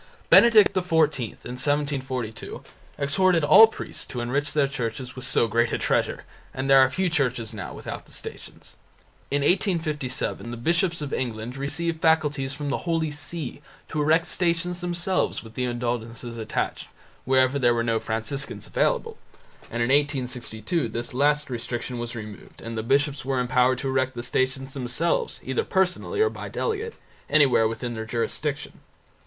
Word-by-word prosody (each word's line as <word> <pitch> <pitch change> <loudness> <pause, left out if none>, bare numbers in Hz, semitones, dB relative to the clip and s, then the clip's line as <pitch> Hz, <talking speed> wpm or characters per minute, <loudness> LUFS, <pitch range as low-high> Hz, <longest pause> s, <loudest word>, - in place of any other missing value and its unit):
Benedict 225 -4 +7
XIV 165 -6 +2 0.3
in 125 +1 -5
1742 135 -6 -2 0.3
exhorted 165 +4 +2
all 220 +9 +9
priests 225 - -6
to 125 - -5
enrich 135 +5 -1
their 145 -2 +2
churches 125 -1 -4
with 130 - -4
so 115 - +2
great 115 +1 +1
a - - 0
treasure, - - 0 0.3
and 130 +1 -2
there 135 0 +7
are 130 -1 +6
few 185 +7 0
churches 125 -8 -1
now 105 -3 -6
without - - -7
the - - -17
Stations. - - -10 0.5
In 140 0 0
1857 155 - 0
the 120 - -5
bishops 170 - 0
of 140 - -5
England 120 -1 -3
received 160 +4 -2
faculties 150 -4 +2
from 140 0 -4
the 170 - -3
Holy 160 -2 +1
See 145 -1 -4 0.3
to 155 - -1
erect 160 +3 +3
Stations 175 0 0
themselves, 175 -2 -1
with 115 -1 -12
the 125 - -1
indulgences 120 -1 -3
attached, 110 -1 -3 0.4
wherever 130 +1 +3
there 120 -2 +3
were 115 - +1
no 115 -1 +1
Franciscans 115 +6 -2
available, - - 0 0.5
and 120 +1 -1
in 120 - 0
1862 130 - 0
this 120 +2 -4
last 150 +3 +2
restriction 120 0 -4
was 120 0 -5
removed 110 -2 -9
and 115 0 -6
the 110 - -1
bishops 140 +4 +1
were 135 -1 -1
empowered 125 +1 +3
to 135 - -3
erect 130 -1 0
the 120 - -4
Stations 130 +1 -1
themselves, 135 +6 0
either 130 -1 -1
personally 190 - 0
or 440 - +4
by - - -7
delegate, 450 0 -2 0.3
anywhere 135 -7 +5
within 115 +2 -4
their 110 -1 -5
jurisdiction. 135 +6 -3
135 Hz, 160 wpm, -25 LUFS, 120-155 Hz, 0.5 s, all